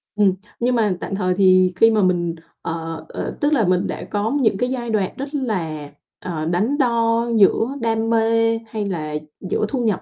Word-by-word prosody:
Ừm, 200 -3 +4 0.3
nhưng 245 +1 +1
mà 215 -5 +2
tạm 195 - -3
thời 185 -2 0
thì 185 -1 +5
khi 225 +5 +5
mà 215 -1 +2
mình, 175 -3 +1 0.3
ờ 165 0 -5
ờ, - - -5
tức 295 +1 +2
là 225 -10 +2
mình 180 0 +2
đã - - -5
có 210 +2 0
những 220 -5 +2
cái 250 +4 0
giai 245 -2 -3
đoạn 205 -4 0
rất 275 +2 -6
là, 165 - -3 0.3
ờ, 165 -4 -4
đắn 200 - 0
đo 235 -3 +2
giữa 225 +6 +3
đam 225 -1 0
mê 225 0 +2
hay 215 -2 -3
là 155 -6 -3 0.3
giữa - - 0
thu 255 -3 -1
nhập 205 -4 0
215 Hz, 200 wpm, -21 LUFS, 185-230 Hz, 0.3 s, thì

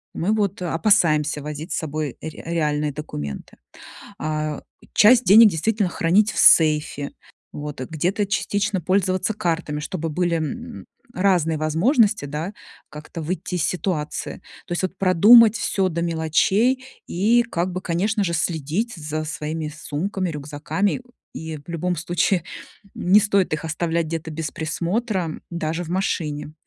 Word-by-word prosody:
мы 195 +6 0
вот 200 -3 0
опасаемся 160 -5 +2
возить 150 +3 -6
с - - -1
собой 155 -3 -4
ре 160 -1 -7
реальные 150 -3 0
документы. 75 - -7 0.6
А, 155 -1 -3 0.3
часть 235 +3 +6
денег 210 +4 +8
действительно 200 +4 0
хранить 190 +6 +2
в - - -9
сейфе, 150 -3 +4 0.4
вот 145 -3 -6
где-то 180 +9 -1
частично 205 0 -1
пользоваться 185 +3 +1
картами, 165 -7 -2
чтобы 165 +1 -4
были, 175 +2 0
м, 235 - -5 0.3
разные 175 -4 +2
возможности, 200 - +2
да, 150 +7 -4 0.4
как-то 155 +2 -8
выйти 180 +2 -3
из 170 - 0
ситуации. 170 -4 -2 0.3
То 175 - -3
есть 175 - -2
вот 185 0 -2
продумать 210 +5 +7
всё 195 -4 0
до 170 0 -2
мелочей 190 +10 +1 0.2
и 220 +7 +3
как 185 -5 -2
бы, 185 - -4
конечно 200 +5 0
же, 170 - -1
следить 165 - -1
за 155 -1 -4
своими 155 -1 -4
сумками, 180 +5 -3
рюкзаками. 150 - -2 0.3
И 160 -1 -6
в 145 - -17
любом 175 +2 -1
случае 175 +2 0 0.5
не 190 +4 +4
стоит 200 -2 +1
их 155 +1 -3
оставлять 165 +1 -1
где-то 165 0 -4
без 155 0 -4
присмотра, 175 +2 -2
даже 170 0 -2
в 165 - -9
машине. 155 -5 -2
170 Hz, 140 wpm, -22 LUFS, 155-195 Hz, 0.6 s, денег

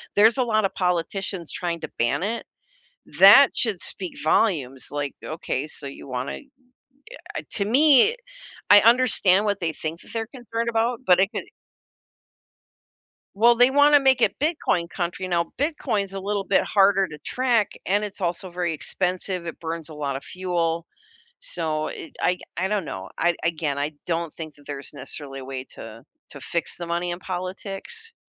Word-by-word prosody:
there's 220 +4 +6
a 255 - +3
lot 215 -3 +1
of 195 - -1
politicians 180 0 -2
trying 170 -2 -3
to - - -5
ban 120 +9 +1
it. 225 +3 -3 0.7
That 210 +9 +9
should 215 -7 0
speak 185 -1 -3
volumes, 150 - +1
like, 145 -1 -3
"Okay, 155 -3 -3
so 150 -1 -7
you 135 - -10
wanna" 130 0 -4 1.0
uh, - - -5
to 200 - +1
me, 285 - +5 0.5
I 205 - +10
understand 220 -5 +4
what 205 -2 0
they 165 -2 -1
think 160 +2 -5
that - - -15
they're 225 -1 -2
concerned 235 -2 -4
about, 230 +1 +1
but 180 0 +6
it 195 - +3
could - - -4 1.9
Well, 235 +3 +5
they 245 +2 +5
want 290 +1 +6
to 290 - +8
make 265 -2 +3
it - - +3
bitcoin 295 - 0
country. 175 +1 -3
Now, 170 -2 0
Bitcoin's 240 - -1
a 195 - -4
little 200 +1 -2
bit 190 0 +2
harder 195 -1 +3
to 150 -3 -10
track, 240 - 0
and 205 +2 +1
it's 205 -1 -6
also 175 +1 -2
very 175 -1 -2
expensive, 180 +3 -2
it 165 - -7
burns 165 -1 -5
a 155 - -9
lot 140 -2 -3
of 135 - -6
fuel. 170 -3 -2 0.6
So, 155 - -2
it - - -9
I 180 - +3
c - - -22 0.2
I 185 +2 0
don't 205 -5 -1
know. 95 -5 -7
I 175 +1 +2
again, 160 -4 -1
I 145 +2 -1
don't 170 -2 -2
think 155 -2 -8
that 145 - -20
there's 140 0 -6
necessarily 140 -1 -6
a - - -9
way 130 -1 -6
to 115 0 -10 0.3
to 140 - -10
fix 165 +6 -3
the 175 - -5
money 170 +1 -2
in 175 - -4
politics, 195 - -5
185 Hz, 180 wpm, -24 LUFS, 160-215 Hz, 1.9 s, I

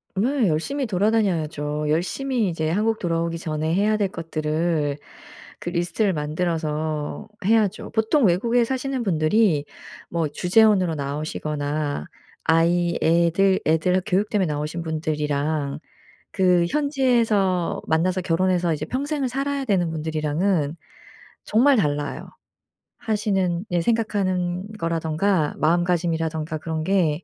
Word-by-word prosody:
네. 240 +4 +1
열심히 265 - -1
돌아다녀야죠. 175 -8 0
열심히 220 - 0
이제 160 -2 -2
한국 220 +6 0
돌아오기 165 -1 -1
전에 155 -1 -2
해야 210 +4 +2
될 205 -2 0
것들을 155 -3 -1 0.6
그 - - -4
리스트를 180 +3 0
만들어서 155 -1 -2 0.2
해야죠. 215 -2 +1
보통 225 +5 +2
외국에 230 +7 +2
사시는 265 0 -2
분들이 165 -2 +2 0.4
뭐 165 -2 0
주재원으로 185 +2 +3
나오시거나 145 - -3 0.4
아이 170 +1 +2
애들 170 +4 +3
애들 160 +3 +2
학 185 - -1
교육 205 +1 +1
때문에 200 -4 +1
나오신 150 +3 -3
분들이랑 150 -2 -2 0.5
그 180 -2 +3
현지에서 235 - +1
만나서 180 +4 +1
결혼해서 180 0 +1
이제 150 - -4
평생을 280 +1 -2
살아야 275 +2 -2
되는 185 -8 +1
분들이랑은 155 +1 -1 0.7
정말 260 +5 +4
달라요. 145 -6 -1 0.7
하시는 195 -4 0
예 175 -1 +2
생각하는 185 -4 0
거라든가 165 +1 0
마음가짐이라든가 165 -1 0
그런 160 0 -3
게 175 -3 +1
175 Hz, 300 characters per minute, -23 LUFS, 155-205 Hz, 0.7 s, 정말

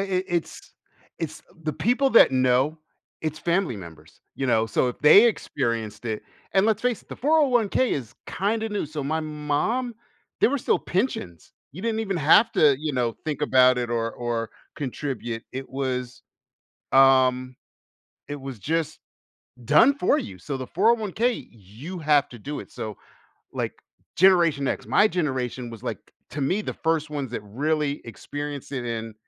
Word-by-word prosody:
it 190 -1 -1
it's 170 -1 -4 0.5
it's 155 -2 -5 0.2
the 155 - -1
people 250 - +1
that 225 - +7
know, 130 +4 +2 0.4
it's 155 0 -3
family 170 - 0
members, 80 -4 -13
you 135 - -2
know, 115 -2 +2
so 125 +2 +1
if 125 - -6
they 155 +10 +8
experienced 115 - -1
it 110 -1 -3 0.3
And 195 +1 +4
let's 220 -1 +1
face 250 -3 0
it, - - -32
the - - -8
401k 260 -5 +2
is 120 -4 -4
kinda 220 +3 -1
new, 205 -6 -2
so 150 -1 -5
my 160 +3 -1
mom, 155 - -2 0.5
there - - +5
were 285 - 0
still - - +1
pensions. 175 - -3 0.2
You 180 +7 -9
didn't 225 -1 -1
even 200 -4 -2
have 170 +9 +5
to, 145 -3 +4
you 150 0 -3
know, 120 -3 0
think 150 -1 -3
about 130 -3 +5
it 120 -1 -2
or 115 -1 -1
or 120 -2 -3 0.3
contribute. 125 -4 -4
It 135 +1 -6
was, 130 -2 -4 0.7
um, 130 -1 +4 0.7
it 145 0 -5
was 135 -5 -7
just 160 +5 -2 0.7
done 155 - +5
for 230 - +2
you. 95 -3 -7
So, 135 +9 -5
the 130 - -5
401k, 230 - +1
you 115 - -10
have 150 -2 +3
to 120 - -10
do 145 +7 -5
it, - - -12
so, 105 -2 -6 0.6
like, - - -2 0.4
Generation 170 -6 +4
X, - - -2
my 210 - +5
generation 130 - -2
was, 115 -2 -10
like, - - -3 0.3
to 145 - -4
me, 185 +10 +1
the - - -4
1st 160 -2 -1
ones 140 -4 -3
that 125 - -4
really 145 +7 -1
experienced 145 +5 -6
it 125 -3 -3
and, 115 -1 -4
145 Hz, 165 wpm, -25 LUFS, 125-185 Hz, 0.7 s, they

